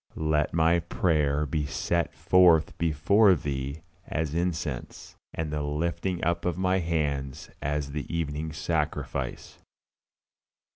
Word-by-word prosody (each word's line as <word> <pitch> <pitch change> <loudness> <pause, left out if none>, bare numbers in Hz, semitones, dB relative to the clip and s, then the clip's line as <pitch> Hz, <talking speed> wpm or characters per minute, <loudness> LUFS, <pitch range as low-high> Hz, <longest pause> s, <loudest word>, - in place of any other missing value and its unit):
"LET 75 -1 +1
MY 85 +1 +3
PRAYER 75 -3 +1
BE 75 0 -2
SET 85 +4 -1
FORTH 85 -4 +4
BEFORE 90 +6 +4
THEE 70 0 -4 0.2
AS 80 -2 -2
INCENSE: 80 -6 -3 0.2
AND 80 -2 -3
THE 75 - -1
LIFTING 85 +5 -2
UP 85 +1 0
OF 90 -2 -1
MY 95 0 +2
HANDS 75 -6 -2
AS 70 0 -2
THE 75 0 -5
EVENING 80 -1 -2
SACRIFICE." 75 0 -3
80 Hz, 115 wpm, -27 LUFS, 75-85 Hz, 0.2 s, FORTH